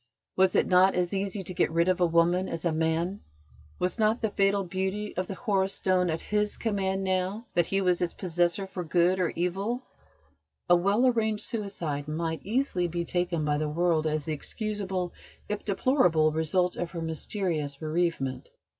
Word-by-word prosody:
Was 190 Hz, -1 st, +3 dB
it -, -, +4 dB
not 185 Hz, +1 st, +5 dB
as 180 Hz, +1 st, 0 dB
easy 195 Hz, 0 st, -2 dB
to 185 Hz, -, -6 dB
get -, -, +2 dB
rid 170 Hz, +2 st, +2 dB
of 185 Hz, -1 st, +1 dB
a 175 Hz, -, +5 dB
woman 170 Hz, +3 st, +2 dB
as 165 Hz, +1 st, -4 dB
a 170 Hz, -, +2 dB
man? 160 Hz, +4 st, 0 dB, 0.6 s
Was 180 Hz, +5 st, -1 dB
not 220 Hz, +2 st, +3 dB
the 220 Hz, -2 st, -1 dB
fatal 200 Hz, 0 st, +2 dB
beauty 190 Hz, +3 st, -3 dB
of 185 Hz, 0 st, -2 dB
the 195 Hz, -, -5 dB
Horus 195 Hz, -4 st, 0 dB
Stone 185 Hz, -1 st, +1 dB
at 160 Hz, 0 st, -1 dB
his 210 Hz, 0 st, -1 dB
command 195 Hz, -3 st, -1 dB
now 190 Hz, +4 st, -1 dB
that 175 Hz, -2 st, +2 dB
he 195 Hz, 0 st, +1 dB
was 180 Hz, -1 st, +2 dB
its 175 Hz, -, -1 dB
possessor 175 Hz, +1 st, 0 dB
for 190 Hz, -1 st, -5 dB
good 175 Hz, +3 st, +2 dB
or 180 Hz, -, +2 dB
evil? 195 Hz, +8 st, -1 dB, 0.8 s
A 175 Hz, -, +6 dB
well 200 Hz, +7 st, +2 dB
arranged 220 Hz, -4 st, +1 dB
suicide 170 Hz, -10 st, -3 dB
might 160 Hz, +1 st, -2 dB
easily 210 Hz, -5 st, 0 dB
be 170 Hz, 0 st, -3 dB
taken 175 Hz, -3 st, -1 dB
by 150 Hz, 0 st, +1 dB
the 155 Hz, 0 st, -1 dB
world 160 Hz, 0 st, +1 dB
as 155 Hz, -1 st, -1 dB
the 155 Hz, -, -2 dB
excusable, 190 Hz, +1 st, -3 dB, 0.3 s
if 210 Hz, 0 st, -3 dB
deplorable, 190 Hz, -, +3 dB
result 170 Hz, +3 st, +1 dB
of 175 Hz, -, -2 dB
her 170 Hz, -2 st, -6 dB
mysterious 160 Hz, -2 st, -2 dB
bereavement. 155 Hz, -4 st, -2 dB
180 Hz, 180 wpm, -28 LUFS, 165-195 Hz, 0.8 s, A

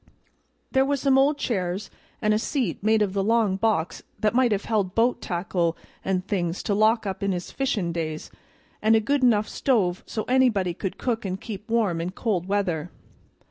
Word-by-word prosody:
There 265 Hz, -1 st, +4 dB
was 280 Hz, 0 st, 0 dB
some 270 Hz, 0 st, +3 dB
old 285 Hz, +2 st, +3 dB
chairs, 190 Hz, -5 st, -2 dB, 0.3 s
an' 215 Hz, 0 st, +3 dB
a 215 Hz, -, +2 dB
seat 235 Hz, -, -2 dB
made 215 Hz, +1 st, +3 dB
of 200 Hz, -1 st, -3 dB
a 195 Hz, -, +2 dB
long 220 Hz, -1 st, +2 dB
box 195 Hz, -5 st, 0 dB, 0.2 s
that 215 Hz, 0 st, +1 dB
might 250 Hz, -1 st, +3 dB
have 205 Hz, -1 st, 0 dB
held 205 Hz, -4 st, 0 dB
boat 240 Hz, +1 st, +2 dB
tackle 175 Hz, -2 st, -1 dB, 0.3 s
an' 190 Hz, -1 st, 0 dB
things 180 Hz, -3 st, -2 dB
to 205 Hz, -, 0 dB
lock 220 Hz, +2 st, +3 dB
up 190 Hz, -1 st, -4 dB
in 200 Hz, 0 st, 0 dB
his 175 Hz, -1 st, -5 dB
fishin' 230 Hz, -11 st, -1 dB
days, 155 Hz, -2 st, -4 dB, 0.5 s
and 220 Hz, +1 st, +4 dB
a -, -, +5 dB
good 275 Hz, +6 st, 0 dB
enough 215 Hz, -4 st, +3 dB
stove 195 Hz, -9 st, 0 dB
so 215 Hz, -, -3 dB
anybody 240 Hz, -9 st, +2 dB
could 190 Hz, +2 st, -5 dB
cook 230 Hz, -3 st, -2 dB
and 190 Hz, -1 st, -3 dB
keep 210 Hz, 0 st, -8 dB
warm 210 Hz, -8 st, +1 dB
in 170 Hz, -, -2 dB
cold 190 Hz, -6 st, -1 dB
weather. 180 Hz, -5 st, -1 dB
210 Hz, 190 wpm, -25 LUFS, 185-230 Hz, 0.5 s, a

